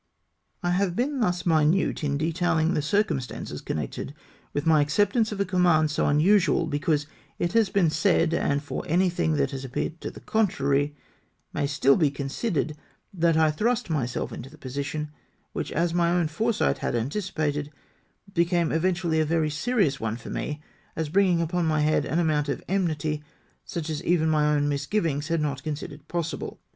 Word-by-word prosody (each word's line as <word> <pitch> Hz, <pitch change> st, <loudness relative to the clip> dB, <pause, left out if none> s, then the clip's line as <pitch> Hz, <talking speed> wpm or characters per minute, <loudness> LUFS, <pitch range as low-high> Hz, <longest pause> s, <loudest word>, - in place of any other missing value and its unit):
I 175 Hz, -, +1 dB
have 180 Hz, -1 st, +1 dB
been 270 Hz, +5 st, 0 dB
thus 180 Hz, -6 st, 0 dB
minute 160 Hz, +1 st, +2 dB
in 140 Hz, -1 st, 0 dB
detailing 165 Hz, +1 st, +1 dB
the 150 Hz, -, +1 dB
circumstances 150 Hz, -5 st, -1 dB
connected 75 Hz, -, -4 dB, 0.4 s
with 145 Hz, +2 st, -2 dB
my 160 Hz, -2 st, +5 dB
acceptance 205 Hz, -, +2 dB
of 205 Hz, -, -5 dB
a 200 Hz, -, +2 dB
command 175 Hz, -5 st, +3 dB
so -, -, +1 dB
un 145 Hz, +1 st, +3 dB
usual, 190 Hz, 0 st, +4 dB
because 150 Hz, -1 st, 0 dB, 0.3 s
it 175 Hz, -, -1 dB
has 225 Hz, -3 st, +4 dB
been 175 Hz, -6 st, +2 dB
said, 165 Hz, -1 st, +2 dB
and 145 Hz, -3 st, 0 dB
for 145 Hz, -, -4 dB
anything 175 Hz, -, +2 dB
that 70 Hz, -2 st, +1 dB
has 135 Hz, 0 st, -5 dB
appeared 135 Hz, +5 st, -4 dB
to -, -, -4 dB
the -, -, -11 dB
contrary, 145 Hz, -9 st, +1 dB, 0.6 s
may 140 Hz, -, 0 dB
still 140 Hz, -1 st, +4 dB
be 155 Hz, -5 st, +3 dB
considered, 145 Hz, -, -2 dB, 0.4 s
that 165 Hz, -3 st, +2 dB
I 160 Hz, -1 st, +4 dB
thrust 225 Hz, +5 st, 0 dB
myself 125 Hz, -6 st, -2 dB
into 135 Hz, -, -8 dB
the 155 Hz, -, -15 dB
position, 145 Hz, +3 st, -4 dB, 0.4 s
which, -, -, -3 dB
as 170 Hz, +1 st, 0 dB
my 170 Hz, -1 st, +2 dB
own 175 Hz, -2 st, +1 dB
foresight 220 Hz, +8 st, 0 dB
had' -, -, -1 dB
anticipated, 150 Hz, -, -2 dB, 0.6 s
became 170 Hz, -1 st, +2 dB
eventually 170 Hz, -1 st, +1 dB
a -, -, +4 dB
very 155 Hz, 0 st, +1 dB
serious 155 Hz, -, +1 dB
one 115 Hz, 0 st, -2 dB
for 120 Hz, -, -9 dB
me, 150 Hz, 0 st, -4 dB, 0.3 s
as 160 Hz, -2 st, -2 dB
bringing 180 Hz, -1 st, +3 dB
upon 170 Hz, 0 st, 0 dB
my 155 Hz, -1 st, +2 dB
head 155 Hz, +1 st, +2 dB
an 160 Hz, -, -1 dB
amount 155 Hz, -4 st, +1 dB
of -, -, -3 dB
enmity, 155 Hz, -5 st, -1 dB, 0.4 s
such 165 Hz, -2 st, -4 dB
as 155 Hz, -2 st, -3 dB
even 160 Hz, -2 st, +2 dB
my 150 Hz, -1 st, +3 dB
own 145 Hz, 0 st, +1 dB
misgivings 145 Hz, +1 st, -1 dB
had 165 Hz, -1 st, 0 dB
not 140 Hz, -3 st, -2 dB
considered 150 Hz, 0 st, -6 dB
possible. 170 Hz, -1 st, -4 dB
160 Hz, 175 wpm, -26 LUFS, 145-175 Hz, 0.6 s, my